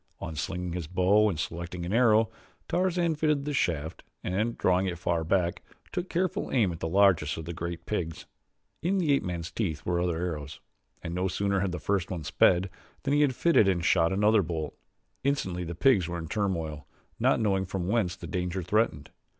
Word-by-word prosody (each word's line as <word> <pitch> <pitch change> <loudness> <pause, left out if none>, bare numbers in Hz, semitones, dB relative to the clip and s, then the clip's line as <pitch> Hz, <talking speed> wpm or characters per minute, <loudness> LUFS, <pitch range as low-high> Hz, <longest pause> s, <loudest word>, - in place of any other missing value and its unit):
Un 80 - -5
slinging 90 +2 -3
his 85 -3 -4
bow 95 +5 +3
and 85 -7 -3
selecting 85 +1 -4
an 90 - -3
arrow, 110 -2 +4 0.4
Tarzan 175 -2 +1
fitted 150 -2 +1
the 145 - -2
shaft 80 - -1 0.2
and, 105 +6 -1
drawing 90 +1 +2
it 90 -1 -3
far 85 -1 0
back, 85 +1 0 0.3
took 180 +1 -3
careful 180 0 -1
aim 110 -8 +3
at 85 - -7
the 80 - -2
largest 90 -4 +3
of 80 - -6
the 85 - -5
great 85 -1 -5
pigs. 85 -6 -3 0.6
In 185 +5 +1
the 160 -6 +2
ape 140 - +2
man's 85 -2 -4
teeth 85 -8 -3
were 85 -1 +1
other 90 -2 0
arrows, 80 -5 -4 0.4
and 85 - -4
no 90 +2 0
sooner 100 +1 0
had 95 -1 0
the 90 - -3
first 95 +2 -1
one 85 -4 -4
sped, 90 +5 +3 0.3
than 140 - 0
he 145 - +4
had 140 -4 +3
fitted 165 -11 +4
and 90 -3 +1
shot 85 -1 +3
another 105 +2 +4
bolt. 80 -3 -4 0.5
Instantly 95 -11 -1
the 85 0 -5
pigs 100 -3 +4
were 85 - -3
in 80 -1 -5
turmoil, 80 -7 -2 0.3
not - - +3
knowing 95 -4 +1
from 90 -1 -3
whence 100 -4 +1
the - - -10
danger 90 0 -2
threatened. 90 -6 0
90 Hz, 200 wpm, -28 LUFS, 85-110 Hz, 0.6 s, arrow